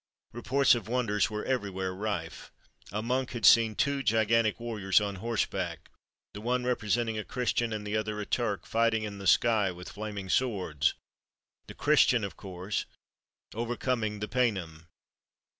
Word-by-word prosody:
Reports 130 Hz, +4 st, +3 dB
of 115 Hz, -4 st, -2 dB
wonders 115 Hz, -4 st, +1 dB
were 105 Hz, -1 st, -4 dB
every 125 Hz, -6 st, -1 dB
where 95 Hz, -1 st, -3 dB
rife. 95 Hz, -4 st, -4 dB, 0.4 s
A 105 Hz, +3 st, -3 dB
monk 130 Hz, +2 st, -1 dB
had 115 Hz, -3 st, -2 dB
seen 115 Hz, -2 st, +6 dB
two 140 Hz, 0 st, +1 dB
gigantic 115 Hz, -2 st, +2 dB
warriors 110 Hz, -5 st, +1 dB
on 100 Hz, -2 st, -3 dB
horseback, 115 Hz, +2 st, -2 dB, 0.4 s
the 105 Hz, -, -8 dB
one 125 Hz, +2 st, 0 dB
representing 115 Hz, -2 st, 0 dB
a -, -, -3 dB
Christian 120 Hz, -1 st, -1 dB
and 105 Hz, -1 st, -4 dB
the 105 Hz, +1 st, -2 dB
other 110 Hz, -1 st, -2 dB
a 105 Hz, -, -3 dB
Turk, 100 Hz, -8 st, -1 dB
fighting 115 Hz, -1 st, +1 dB
in 100 Hz, -2 st, -6 dB
the 95 Hz, -, -4 dB
sky 110 Hz, -4 st, +4 dB
with 90 Hz, 0 st, -8 dB
flaming 105 Hz, -2 st, -6 dB
swords, 95 Hz, -, +1 dB, 0.7 s
the -, -, -10 dB
Christian 140 Hz, -6 st, +4 dB
of 100 Hz, -, -4 dB
course 95 Hz, +1 st, -4 dB, 0.7 s
overcoming 115 Hz, -2 st, -2 dB
the 105 Hz, -, -2 dB
Paynim. 95 Hz, -11 st, -1 dB
110 Hz, 155 wpm, -29 LUFS, 100-120 Hz, 0.7 s, seen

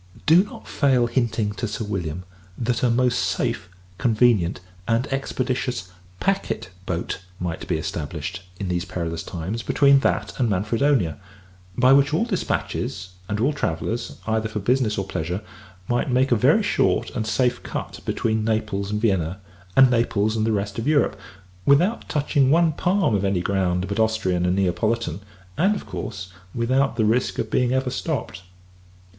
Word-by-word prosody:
Do 170 Hz, +4 st, +6 dB
not 210 Hz, -, -11 dB
fail 130 Hz, -4 st, +3 dB
hinting 120 Hz, -3 st, 0 dB
to 110 Hz, +3 st, -3 dB
Sir 105 Hz, +1 st, -4 dB
William, 90 Hz, -4 st, -3 dB, 0.3 s
that 120 Hz, 0 st, -1 dB
a 125 Hz, -, +3 dB
most 125 Hz, -2 st, +2 dB
safe, 90 Hz, -1 st, -1 dB, 0.3 s
convenient, 110 Hz, -7 st, +3 dB, 0.3 s
and 115 Hz, +2 st, +2 dB
expeditious 130 Hz, -5 st, -2 dB, 0.3 s
packet 195 Hz, -, -1 dB, 0.2 s
boat, 90 Hz, +1 st, -3 dB, 0.2 s
might 85 Hz, -2 st, -4 dB
be -, -, 0 dB
established, 80 Hz, +4 st, -4 dB, 0.2 s
in 100 Hz, -, -3 dB
these 90 Hz, -1 st, -1 dB
perilous 85 Hz, -3 st, -4 dB
times, 95 Hz, +7 st, -4 dB
between 140 Hz, +6 st, +4 dB
that -, -, 0 dB
and 120 Hz, -3 st, +2 dB
Manfredonia: 105 Hz, -, +1 dB, 0.6 s
by 130 Hz, +1 st, +6 dB
which 140 Hz, +2 st, +4 dB
all 220 Hz, -, +2 dB
dispatches, 130 Hz, -, -2 dB, 0.2 s
and 105 Hz, 0 st, -1 dB
all 135 Hz, +7 st, +2 dB
travellers, 115 Hz, -, -3 dB
either 110 Hz, 0 st, 0 dB
for 110 Hz, -, -5 dB
business 115 Hz, +1 st, +1 dB
or 95 Hz, -, -1 dB
pleasure, 90 Hz, +2 st, -3 dB, 0.4 s
might 120 Hz, +3 st, 0 dB
make 130 Hz, +1 st, +2 dB
a -, -, +6 dB
very 105 Hz, -, +4 dB
short -, -, +1 dB
and 110 Hz, -, -3 dB
safe 125 Hz, +2 st, +1 dB
cut -, -, -5 dB
between 110 Hz, -1 st, 0 dB
Naples 105 Hz, -3 st, -1 dB
and 105 Hz, 0 st, -1 dB
Vienna, 95 Hz, -5 st, 0 dB, 0.4 s
and 130 Hz, -1 st, +7 dB
Naples 110 Hz, -3 st, +1 dB
and 110 Hz, 0 st, +1 dB
the -, -, +2 dB
rest 100 Hz, 0 st, -2 dB
of 115 Hz, -, -3 dB
Europe, 150 Hz, -2 st, +3 dB, 0.5 s
without 175 Hz, +11 st, +3 dB
touching 140 Hz, -2 st, +2 dB
one 165 Hz, +2 st, +4 dB
palm 180 Hz, -, +1 dB
of 100 Hz, -2 st, +1 dB
any 95 Hz, -2 st, +1 dB
ground 95 Hz, -1 st, 0 dB
but 100 Hz, +2 st, -3 dB
Austrian 95 Hz, -6 st, +1 dB
and 90 Hz, -, +2 dB
Neapolitan; 100 Hz, 0 st, 0 dB, 0.4 s
and, 195 Hz, +5 st, +4 dB
of -, -, -6 dB
course, 95 Hz, -3 st, -6 dB, 0.2 s
without 130 Hz, +3 st, +1 dB
the 110 Hz, -2 st, +2 dB
risk 115 Hz, +4 st, +1 dB
of -, -, -3 dB
being 125 Hz, -1 st, +2 dB
ever 130 Hz, -1 st, 0 dB
stopped. 135 Hz, -, -3 dB
110 Hz, 160 wpm, -23 LUFS, 95-130 Hz, 0.6 s, and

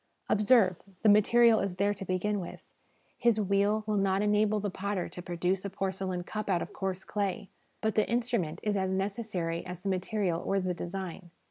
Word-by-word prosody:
Observe, 210 Hz, -4 st, +4 dB, 0.3 s
the 215 Hz, -, +6 dB
material 225 Hz, +2 st, +6 dB
is 195 Hz, -2 st, -2 dB
there 200 Hz, +2 st, +1 dB
to 195 Hz, -, -7 dB
begin 195 Hz, +3 st, -1 dB
with; 175 Hz, -, -8 dB, 0.5 s
his 235 Hz, -2 st, +3 dB
wheel 200 Hz, +2 st, +2 dB
will 215 Hz, -1 st, 0 dB
not 195 Hz, 0 st, +2 dB
enable 210 Hz, 0 st, +2 dB
the 205 Hz, -1 st, -2 dB
potter 195 Hz, -1 st, -2 dB
to 180 Hz, -, -8 dB
produce 180 Hz, +1 st, -1 dB
a 200 Hz, -, -3 dB
porcelain 190 Hz, -2 st, -3 dB
cup 215 Hz, +3 st, -5 dB
out 175 Hz, -3 st, +2 dB
of -, -, -10 dB
coarse 190 Hz, -1 st, -3 dB
clay; 200 Hz, -2 st, -2 dB, 0.3 s
but 220 Hz, -1 st, +1 dB
the 215 Hz, -, +1 dB
instrument 230 Hz, -9 st, -1 dB
is 210 Hz, -1 st, 0 dB
as 190 Hz, -1 st, 0 dB
necessary 190 Hz, -3 st, -2 dB
as 180 Hz, -1 st, -7 dB
the 195 Hz, -, -2 dB
material 185 Hz, -2 st, -1 dB
or 195 Hz, -, +1 dB
the 185 Hz, -1 st, -1 dB
design. 175 Hz, 0 st, -6 dB
195 Hz, 190 wpm, -30 LUFS, 185-210 Hz, 0.5 s, the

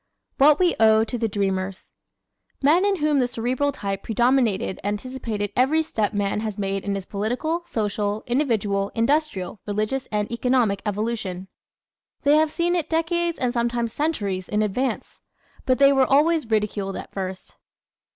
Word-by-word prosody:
What 290 Hz, +2 st, +6 dB
We 360 Hz, -2 st, +2 dB
Owe 220 Hz, 0 st, +5 dB
to 225 Hz, -, -4 dB
the 225 Hz, -, +1 dB
Dreamers 195 Hz, -2 st, -3 dB, 0.7 s
¶ -, -, -25 dB
Men 330 Hz, +7 st, +4 dB
in 405 Hz, -1 st, +2 dB
whom 300 Hz, -4 st, +1 dB
the 250 Hz, -, +2 dB
Cerebral 250 Hz, +4 st, -1 dB
type 195 Hz, -7 st, -4 dB
predominated 235 Hz, -4 st, +1 dB
anticipated 210 Hz, -1 st, -3 dB
every 295 Hz, +6 st, +3 dB
step 220 Hz, -9 st, -1 dB
man 205 Hz, -1 st, -1 dB
has 215 Hz, -2 st, -4 dB
made 195 Hz, -1 st, -2 dB
in 200 Hz, -1 st, -2 dB
his 195 Hz, -2 st, -5 dB
political, 245 Hz, -, -2 dB
social, 210 Hz, -1 st, -2 dB
individual, 215 Hz, -7 st, 0 dB
industrial, 230 Hz, -, 0 dB
religious 215 Hz, +6 st, -2 dB
and 210 Hz, 0 st, -1 dB
economic 235 Hz, -5 st, +1 dB
evolution. 205 Hz, -3 st, -3 dB, 0.7 s
They 285 Hz, 0 st, +4 dB
have 310 Hz, 0 st, +3 dB
seen 345 Hz, +3 st, 0 dB
it 325 Hz, -3 st, -1 dB
decades 335 Hz, +1 st, 0 dB
and 250 Hz, -2 st, -1 dB
sometimes 235 Hz, -1 st, -1 dB
centuries 205 Hz, -, -2 dB
in 210 Hz, 0 st, +1 dB
advance. 250 Hz, +6 st, -3 dB, 0.5 s
But 255 Hz, -1 st, +3 dB
they 280 Hz, 0 st, +6 dB
were 265 Hz, -1 st, +3 dB
always 300 Hz, -1 st, +3 dB
ridiculed 205 Hz, -3 st, -1 dB
at -, -, -7 dB
first. 190 Hz, -1 st, -6 dB
230 Hz, 155 wpm, -23 LUFS, 205-280 Hz, 0.7 s, What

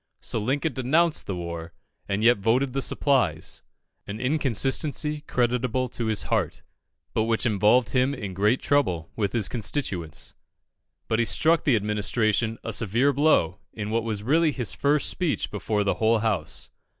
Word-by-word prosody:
So -, -, -3 dB
Lincoln 140 Hz, +8 st, -1 dB
denounced 155 Hz, +6 st, +1 dB
the 95 Hz, -, -2 dB
war, 85 Hz, -1 st, -6 dB, 0.4 s
and 100 Hz, +2 st, -1 dB
yet 120 Hz, -2 st, +5 dB
voted 125 Hz, +6 st, +1 dB
the 135 Hz, -, -1 dB
supplies 125 Hz, -, 0 dB, 0.5 s
an 100 Hz, +2 st, -6 dB
inconsistency 145 Hz, +3 st, 0 dB
creditable 125 Hz, +1 st, 0 dB
to 115 Hz, -1 st, -4 dB
his 110 Hz, -2 st, 0 dB
heart, -, -, -1 dB, 0.5 s
but 110 Hz, -, +1 dB
which 115 Hz, 0 st, 0 dB
involved 110 Hz, +1 st, +3 dB
him 130 Hz, +2 st, +1 dB
in 100 Hz, -7 st, -6 dB, 0.2 s
trouble 95 Hz, -, 0 dB
with 100 Hz, -3 st, -1 dB
his 110 Hz, -5 st, +2 dB
constituents. 100 Hz, -, -3 dB, 0.7 s
But 110 Hz, -, 0 dB
he 120 Hz, -, +3 dB
struck 160 Hz, -, +2 dB
the 135 Hz, -, +4 dB
Administration 110 Hz, +1 st, 0 dB
a 115 Hz, -, -4 dB
severe 115 Hz, +8 st, +1 dB
blow 130 Hz, -, +2 dB
in 105 Hz, -1 st, -5 dB
what 115 Hz, 0 st, 0 dB
was 110 Hz, -3 st, -3 dB
really 155 Hz, +6 st, +3 dB
his 125 Hz, -7 st, -2 dB
first 145 Hz, +1 st, +1 dB
speech 175 Hz, -5 st, -1 dB
before 105 Hz, +1 st, -1 dB
the 100 Hz, -, +1 dB
whole 110 Hz, +1 st, +4 dB
House. 105 Hz, -7 st, -2 dB
115 Hz, 155 wpm, -25 LUFS, 105-135 Hz, 0.7 s, yet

